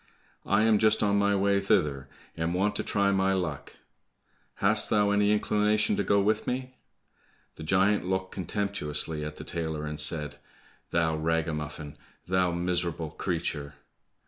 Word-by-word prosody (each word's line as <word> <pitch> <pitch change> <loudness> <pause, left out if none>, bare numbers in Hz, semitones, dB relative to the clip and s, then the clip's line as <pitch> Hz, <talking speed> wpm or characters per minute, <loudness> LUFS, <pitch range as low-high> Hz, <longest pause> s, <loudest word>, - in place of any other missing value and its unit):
I 100 +2 +3
am 110 -2 +4
just 110 0 +3
on 100 -1 +2
my 100 0 +2
way 100 0 +2
thither, 70 -8 +1 0.3
and 80 +2 -2
want 100 +3 +1
to - - -2
try 100 -1 +1
my 95 0 +2
luck. 85 -7 -3 0.8
Hast 105 +2 +2
thou 105 -1 +3
any 105 0 +3
inclination 105 0 +2
to 100 - 0
go 100 0 +3
with 105 +2 +1
me?" 130 0 -3 0.8
The - - -13
giant 95 +4 +2
looked 95 0 -1
contemptuously 80 -6 -2
at 75 0 -5
the - - -8
tailor, 80 -2 -4
and 75 0 -5
said, 75 -1 -1 0.5
"Thou 80 -2 +1
ragamuffin! 75 -2 -3 0.3
Thou 90 -1 +2
miserable 85 -2 -2
creature!" 75 -5 -3
95 Hz, 145 wpm, -28 LUFS, 80-100 Hz, 0.8 s, am